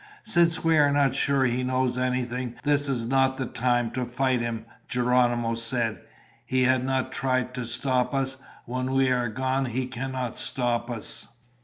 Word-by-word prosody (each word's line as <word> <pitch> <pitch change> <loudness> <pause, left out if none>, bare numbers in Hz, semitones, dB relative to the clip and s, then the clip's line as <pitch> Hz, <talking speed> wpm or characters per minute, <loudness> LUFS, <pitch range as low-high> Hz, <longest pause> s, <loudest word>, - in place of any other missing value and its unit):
"Since 170 -6 +3
we 165 -1 +4
are 145 -1 +5
not 140 -2 +2
sure 135 0 +2
he 125 0 0
knows 130 0 0
anything, 125 -1 -2
this 145 -1 +2
is 120 -4 -1
not 135 +1 +2
the 130 - -2
time 120 -2 0
to 130 +1 -2
fight 125 0 0
him," 115 -1 -3 0.2
Geronimo 120 -1 +1
said. 115 -1 0 0.4
"He 130 0 +1
has 130 0 +3
not 130 0 -1
tried 130 -1 -1
to 125 -1 -4
stop 125 +1 0
us. 135 -1 -1 0.3
When 130 +2 -3
we 135 -1 +3
are 125 -2 +1
gone, 130 +4 -1
he 125 +1 -2
cannot 125 -1 -4
stop 120 -2 -1
us." 115 -3 0
130 Hz, 170 wpm, -26 LUFS, 120-135 Hz, 0.4 s, are